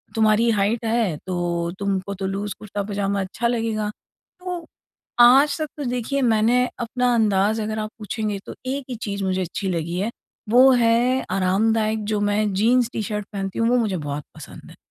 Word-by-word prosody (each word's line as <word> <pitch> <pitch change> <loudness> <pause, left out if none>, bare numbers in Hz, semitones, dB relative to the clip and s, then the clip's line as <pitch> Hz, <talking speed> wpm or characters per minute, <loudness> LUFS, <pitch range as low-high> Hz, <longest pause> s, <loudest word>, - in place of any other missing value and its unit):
तुम्हारी 220 +1 +3
हाइट 220 +2 0
है, 220 -8 +1
तो 175 -2 -1
तुमको 200 -1 -2
तो 195 0 -4
लूज़ 195 +1 -3
कुर्ता 205 -1 -4
पजामा 200 -1 -1
अच्छा 200 +5 -2
लगेगा। 225 -3 -1 0.5
तो 360 -2 -5 0.5
आज 270 +4 +6
तक 310 - -1
तो 295 - -4
देखिए 250 +3 -1
मैंने 235 +1 +3
अपना 245 +1 0
अंदाज़ 215 0 +2
अगर 215 +1 -3
आप 215 0 -3
पूछेंगे, 210 -1 -3
तो - - -8
एक 270 +1 -3
ही 250 - -3
चीज़ 200 -3 -4
मुझे 185 0 0
अच्छी 185 +2 -3
लगी 170 0 -2
है, 220 +4 -1 0.4
वो 255 +3 +7
है 245 +1 +3
आरामदायक 215 +3 +1
जो 210 - +1
मैं 205 0 +1
जीन्स 235 +5 +3
टी-शर्ट 210 -1 -3
पहनती 195 -1 -4
हूँ 230 0 +2
वो 250 - +3
मुझे 215 -6 0
बहुत 145 -2 -4
पसंद - - -11
है। - - -15
215 Hz, 175 wpm, -22 LUFS, 195-235 Hz, 0.5 s, वो